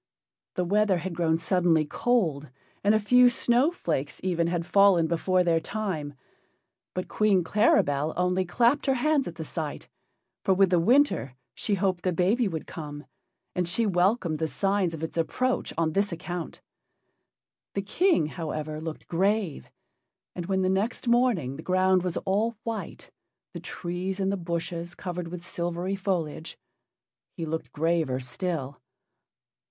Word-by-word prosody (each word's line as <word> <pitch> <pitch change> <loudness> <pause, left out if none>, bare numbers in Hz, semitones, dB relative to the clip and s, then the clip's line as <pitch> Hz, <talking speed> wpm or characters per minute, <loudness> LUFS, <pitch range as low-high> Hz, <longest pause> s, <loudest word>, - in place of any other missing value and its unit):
The 180 - 0
weather 205 0 +3
had 175 +1 -4
grown 165 -1 +1
suddenly 170 -2 +2
cold, 160 - 0 0.3
and 205 +2 +4
a - - +4
few 250 +4 +6
snowflakes 240 - 0
even 170 -3 +1
had 170 -1 -1
fallen 195 -3 +5
before 180 +3 +1
their 170 -2 +2
time. 165 -8 -4 0.8
But 185 - -3
Queen 205 -4 +2
Claribel 155 -6 +2
only 180 +1 +1
clapped 240 +11 +2
her 270 - +3
hands 285 +2 +1
at 170 - -6
the 165 - -5
sight, 155 -1 -5 0.5
for 190 - +3
with 190 -1 +4
the 175 - +4
winter 225 - +3 0.2
she 205 - -1
hoped 185 -2 0
the 185 - +1
baby 195 +8 +2
would 160 -4 -4
come, 145 -2 -8 0.5
and 180 -1 -1
she 230 +6 +2
welcomed 180 -3 +1
the 160 - 0
signs 195 -1 0
of 160 - -8
its 160 - -5
approach 255 +10 0
on 160 -1 +1
this 200 +2 +1
account. 175 0 -5 1.1
The 200 - -1
King, 345 - +2
however, 155 -1 -4
looked 160 -1 -7
grave, 190 - 0 0.7
and 175 -1 -5
when 190 -1 +1
the - - +2
next 200 +7 -1
morning 235 - +2
the - - -7
ground 185 +1 +3
was 180 -1 -2
all 215 +4 0
white, 230 -1 -6 0.4
the - - -6
trees 180 +2 -4
and 195 0 +1
the - - 0
bushes 170 -1 -4
covered 180 -2 -5
with 175 0 -8
silvery 175 +2 -3
foliage, 170 -5 -3 0.8
he 165 - -3
looked 160 +1 -4
graver 160 -4 0
still. 140 +1 -4
180 Hz, 150 wpm, -27 LUFS, 165-200 Hz, 1.1 s, few